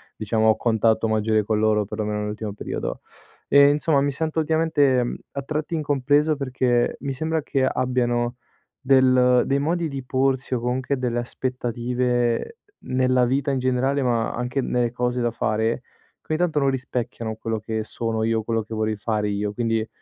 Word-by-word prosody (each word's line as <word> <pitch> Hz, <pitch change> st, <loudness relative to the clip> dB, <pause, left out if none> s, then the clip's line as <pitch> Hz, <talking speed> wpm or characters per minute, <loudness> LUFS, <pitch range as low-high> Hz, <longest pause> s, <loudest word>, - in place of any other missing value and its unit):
diciamo, 110 Hz, +1 st, 0 dB
ho 110 Hz, -, +5 dB
contatto 110 Hz, -1 st, +2 dB
maggiore 110 Hz, 0 st, +2 dB
con 105 Hz, +1 st, 0 dB
loro, 110 Hz, -1 st, +2 dB
per 105 Hz, +2 st, -7 dB
lo 110 Hz, -, 0 dB
meno 105 Hz, 0 st, -2 dB
nell'ultimo 105 Hz, 0 st, -4 dB
periodo. 105 Hz, -, -5 dB, 0.5 s
Ehm, 140 Hz, 0 st, +7 dB
insomma 150 Hz, 0 st, +2 dB
mi 140 Hz, -, +1 dB
sento 160 Hz, +3 st, -2 dB
ultimamente, 155 Hz, -5 st, +2 dB
mhmm, 120 Hz, -, -3 dB, 0.2 s
a 140 Hz, -, -3 dB
tratti 155 Hz, +4 st, -3 dB
incompreso 145 Hz, 0 st, +2 dB
perché 125 Hz, -3 st, 0 dB
mi 140 Hz, -, -3 dB
sembra 160 Hz, +3 st, -1 dB
che 135 Hz, -2 st, 0 dB
abbiano 125 Hz, -2 st, 0 dB, 0.4 s
del 130 Hz, -2 st, +4 dB
dei 140 Hz, +1 st, +1 dB
modi 165 Hz, +3 st, 0 dB
di 135 Hz, -2 st, -5 dB
porsi, 130 Hz, 0 st, 0 dB
o 125 Hz, -, +1 dB
comunque 130 Hz, +3 st, -1 dB
delle 120 Hz, -2 st, -1 dB
aspettative, 125 Hz, -, -1 dB, 0.2 s
nella 130 Hz, -1 st, +2 dB
vita 135 Hz, +3 st, 0 dB
in 135 Hz, -, 0 dB
generale, 130 Hz, +2 st, +1 dB
ma 115 Hz, -2 st, +1 dB
anche 125 Hz, +3 st, -2 dB
nelle 120 Hz, -2 st, 0 dB
cose 125 Hz, 0 st, -1 dB
da 120 Hz, 0 st, +1 dB
fare, 110 Hz, +1 st, -1 dB, 0.4 s
che -, -, -36 dB
ogni 155 Hz, 0 st, 0 dB
tanto 170 Hz, -4 st, +1 dB
non 140 Hz, -1 st, +2 dB
rispecchiano 125 Hz, -3 st, -3 dB
quello 110 Hz, 0 st, -3 dB
che 110 Hz, +1 st, -3 dB
sono 110 Hz, 0 st, -3 dB
io, 115 Hz, 0 st, +1 dB
quello 115 Hz, 0 st, -1 dB
che 110 Hz, -, -9 dB
vorrei 110 Hz, 0 st, -1 dB
fare 105 Hz, 0 st, -1 dB
io. 100 Hz, 0 st, -2 dB
Quindi, 115 Hz, -1 st, -1 dB
125 Hz, 175 wpm, -23 LUFS, 115-135 Hz, 0.5 s, Ehm